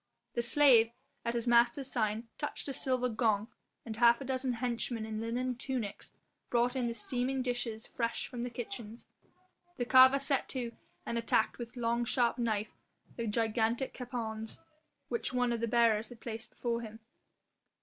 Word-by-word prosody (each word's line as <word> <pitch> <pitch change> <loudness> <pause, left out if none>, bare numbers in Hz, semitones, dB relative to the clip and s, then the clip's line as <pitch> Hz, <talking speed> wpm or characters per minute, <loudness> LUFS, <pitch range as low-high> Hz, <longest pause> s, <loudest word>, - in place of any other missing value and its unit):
The 240 - 0
slave, 240 -2 +6 0.3
at 235 0 -1
his 235 0 -1
master's 240 +3 +3
sign, 220 -1 -1
touched 295 - -2
a 275 - -3
silver 255 -1 +1
gong, 220 -2 +1 0.4
and 220 -2 -6
half 235 0 +6
a 275 - -6
dozen 260 -1 -1
henchmen 235 -1 -2
in 220 0 -4
linen 245 +3 -1
tunics 245 -4 -4 0.4
brought 245 +1 +2
in 250 -2 0
the 235 - -3
steaming 255 +3 0
dishes 240 -3 -2
fresh 230 -1 -2
from 245 -2 -6
the 245 - -2
kitchens. 235 -1 -6 0.7
The 245 - -1
carver 260 +2 +8
set 275 -1 0
to 245 -3 -3 0.3
and 235 - -1
attacked 230 0 +1
with 235 +1 -7
long 235 0 +1
sharp 240 0 +1
knife 215 -3 -1 0.4
the 235 -1 -3
gigantic 225 +3 0
capons 225 -3 -5 0.5
which 465 - -1
one 245 -1 +2
of 235 - -2
the 230 - -1
bearers 225 -1 +3
had 245 -2 -12
placed 225 0 -5
before 235 -1 -2
him. 220 0 -9
235 Hz, 165 wpm, -32 LUFS, 225-250 Hz, 0.7 s, carver